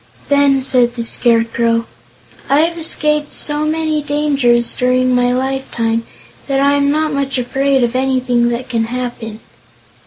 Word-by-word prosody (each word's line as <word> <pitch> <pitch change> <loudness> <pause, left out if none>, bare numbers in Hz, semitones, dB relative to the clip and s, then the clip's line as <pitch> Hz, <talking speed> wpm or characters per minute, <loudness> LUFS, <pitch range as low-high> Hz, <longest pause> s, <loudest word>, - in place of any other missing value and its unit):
Then 280 -2 +3
said 245 -2 +2
the 235 - -3
Scarecrow: 230 0 +1 0.6
"I 280 +2 +4
have 335 +1 0
escaped 300 -2 0
so 300 +1 -1
many 310 -1 -1
dangers, 280 -5 +1
during 255 0 +1
my 245 0 +2
lifetime, 250 -3 -2 0.4
that 275 -1 0
I 280 +1 +3
am 280 0 +1
not 310 +1 0
much 275 -1 -2
afraid 270 +2 0
of 240 +1 -1
anything 255 -2 +1
that 240 +1 -4
can 225 -2 -1
happen." 235 -2 -6
260 Hz, 145 wpm, -15 LUFS, 240-285 Hz, 0.6 s, I